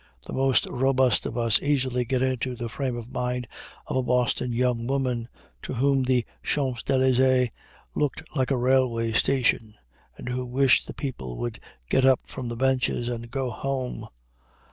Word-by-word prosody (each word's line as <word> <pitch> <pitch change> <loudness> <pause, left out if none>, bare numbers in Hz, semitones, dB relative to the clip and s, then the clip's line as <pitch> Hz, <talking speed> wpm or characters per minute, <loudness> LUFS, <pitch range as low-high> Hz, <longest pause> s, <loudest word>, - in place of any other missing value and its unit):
The - - -7
most 135 -1 +3
robust 130 0 +2
of - - -5
us 115 -3 +2
easily 130 -3 +1
get 130 +2 0
into 130 -1 -1
the 120 -1 -5
frame 130 0 -3
of 120 +1 -8
mind 125 -1 -2 0.4
of - - -4
a - - +3
Boston 125 0 +1
young 120 -1 0
woman, 130 -4 -1 0.3
to - - -5
whom 135 +2 +3
the 125 -2 +2 0.2
Champs 130 -5 -1
Élysées 130 -1 +3 0.4
looked 150 +2 -1
like 130 -3 +1
a 135 - +2
railway 125 -2 +2
station, 115 -2 +1 0.4
and - - -9
who 125 0 -2
wished 130 +1 +3
the - - -8
people 65 - -5
would - - -4 0.3
get 130 - +2
up 130 -1 +5
from 130 -2 -6
the 120 - -4
benches 130 -2 +1
and 120 -1 -5
go 130 0 -2
home. 130 +2 -3
125 Hz, 165 wpm, -26 LUFS, 120-130 Hz, 0.4 s, up